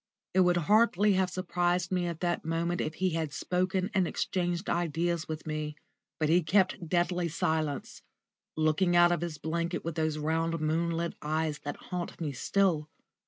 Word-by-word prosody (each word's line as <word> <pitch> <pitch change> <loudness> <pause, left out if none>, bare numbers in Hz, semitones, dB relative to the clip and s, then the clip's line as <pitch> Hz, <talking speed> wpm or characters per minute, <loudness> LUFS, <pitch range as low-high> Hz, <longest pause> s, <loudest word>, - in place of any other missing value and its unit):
It 190 - +3
would 180 -1 +4
hardly 210 +3 +4
have 190 -1 +2
surprised 180 0 0
me 180 -1 +1
at 170 -2 -5
that 175 -1 0
moment 165 +2 -1
if 155 - -3
he 185 +1 0
had 160 -2 -2
spoken 185 +6 -1
and 190 -3 +2
exchanged 175 +1 -2
ideas 170 0 0
with 155 0 -5
me. 155 -1 -3 0.4
But 155 - +2
he 170 +3 +4
kept 180 0 +1
deadly 175 0 +1
silence, 155 -2 -2 0.6
looking 155 +3 +2
out 175 0 +6
of 175 - 0
his 170 -3 -4
blanket 170 +3 -2
with 165 - -2
those 155 -1 -1
round 165 +2 0
moon 160 +2 0
lit 170 0 -2
eyes 155 0 -1
that 145 0 -5
haunt 180 -1 -5
me 155 -4 -2
still. 160 +1 +1
170 Hz, 170 wpm, -30 LUFS, 155-180 Hz, 0.6 s, out